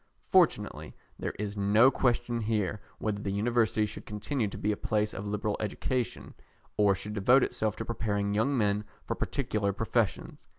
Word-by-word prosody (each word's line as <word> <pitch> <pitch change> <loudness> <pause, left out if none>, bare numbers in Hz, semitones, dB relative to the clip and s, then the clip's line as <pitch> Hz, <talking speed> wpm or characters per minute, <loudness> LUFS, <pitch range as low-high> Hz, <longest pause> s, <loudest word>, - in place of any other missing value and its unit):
Fortunately, - - +2 0.2
there - - -3
is 105 0 -3
no 105 +6 +5
question 120 -2 +1
here 105 -2 -1 0.2
whether 105 -2 -2
the 100 - -2
University 110 +1 +2
should 105 - -7
continue 105 +3 -2
to 100 - -7
be 105 - 0
a - - 0
place 105 0 -1
of 100 +2 -5
liberal 105 0 -1
education, 120 +4 -2 0.4
or 100 -2 +4
should 105 +2 -6
devote 120 +6 +5
itself 110 -1 -1
to 115 - -5
preparing 100 -3 -1
young 120 +7 +1
men 105 -2 +1 0.2
for - - -1
particular 110 -7 -1
professions. 115 +1 -2
105 Hz, 165 wpm, -29 LUFS, 100-115 Hz, 0.4 s, no